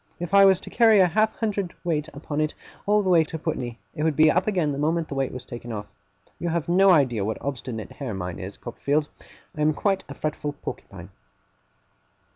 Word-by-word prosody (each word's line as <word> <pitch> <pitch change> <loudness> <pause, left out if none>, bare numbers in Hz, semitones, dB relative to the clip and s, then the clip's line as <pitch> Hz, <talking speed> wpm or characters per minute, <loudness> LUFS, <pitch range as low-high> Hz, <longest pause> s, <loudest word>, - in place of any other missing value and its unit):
If 175 +2 -5
I 200 0 +8
was 190 -2 +5
to - - -10
carry 225 -3 +5
a 185 - +7
half 215 +5 +1
hundred 205 -5 -2
weight 155 -3 -1
upon 150 0 -4
it, 155 0 -1 0.3
all 210 0 +4
the 190 - 0
way 170 -3 +6
to 160 - -6
Putney, 130 -7 -3 0.2
it - - -5
would 155 -1 +1
be 155 +1 +6
up 180 +3 +1
again 180 -8 +1
the 140 - -4
moment 160 +2 0
the - - -4
weight 135 -1 -1
was 125 - -8
taken 120 0 -8
off. 105 -2 -4 0.5
You 170 - -2
have 165 -1 -1
no 190 +3 +5
idea 130 - +4
what 110 +2 -2
obstinate 125 -5 -5
hair 130 -8 -5
mine 90 -1 -5
is, 100 +1 -7
Copperfield. 145 +5 -1 0.5
I 150 - -4
am 150 0 +3
quite 195 +2 0
a - - -7
fretful 150 -1 -3
porcupine. 100 -9 -9
155 Hz, 215 wpm, -25 LUFS, 130-180 Hz, 0.5 s, I